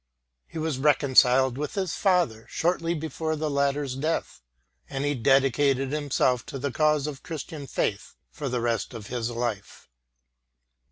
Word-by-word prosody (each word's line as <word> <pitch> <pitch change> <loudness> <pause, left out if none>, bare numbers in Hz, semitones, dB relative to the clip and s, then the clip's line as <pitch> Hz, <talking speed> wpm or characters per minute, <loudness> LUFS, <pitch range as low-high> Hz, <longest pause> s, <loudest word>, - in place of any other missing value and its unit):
He - - -9
was 155 -4 -2
reconciled 130 -2 +4
with 150 -1 -4
his 190 -4 -1
father 175 - +1
shortly 170 0 0
before 160 0 -3
the 155 -1 -2
latter's 140 -1 0
death, 155 - -2 0.5
and 135 +1 -2
he 145 - +1
dedicated 135 +1 +2
himself 140 -4 +1
to 135 - -5
the 140 +1 -2
cause 150 0 +2
of 145 -3 -5
Christian 155 -3 -7
faith 100 -4 -2 0.2
for 145 -3 -4
the 125 -1 -1
rest 115 -1 -1
of 110 -3 -7
his 120 -2 -2
life. 115 -4 -4
140 Hz, 150 wpm, -26 LUFS, 125-155 Hz, 0.5 s, reconciled